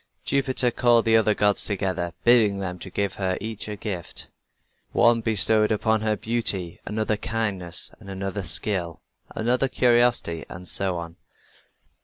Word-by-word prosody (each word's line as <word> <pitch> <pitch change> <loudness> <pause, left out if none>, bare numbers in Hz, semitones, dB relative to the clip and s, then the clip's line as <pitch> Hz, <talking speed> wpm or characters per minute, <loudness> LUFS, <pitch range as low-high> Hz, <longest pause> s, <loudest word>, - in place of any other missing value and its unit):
Jupiter 130 -2 +1
called 120 -1 +3
the 115 0 +4
other 110 -1 +3
gods 105 -1 +2
together, 95 -4 -2
bidding 115 -4 +4
them 90 -2 -5
give 100 +1 -3
her 95 -1 0
each 110 0 -6
a 105 - -5
gift. 95 -5 -6 0.6
One 120 -1 +4
bestowed 110 0 +2
upon 110 0 +1
her 110 -1 0
beauty, 100 -6 -1
another, 110 0 -1
kindness, 105 -6 -2
another, 95 -1 -5
skill, 90 -3 0 0.3
another, 125 +4 +1
curiosity, 120 -10 +2
and 90 +1 -10
so 95 -1 +3
on. 85 0 -8
105 Hz, 135 wpm, -24 LUFS, 95-115 Hz, 0.6 s, the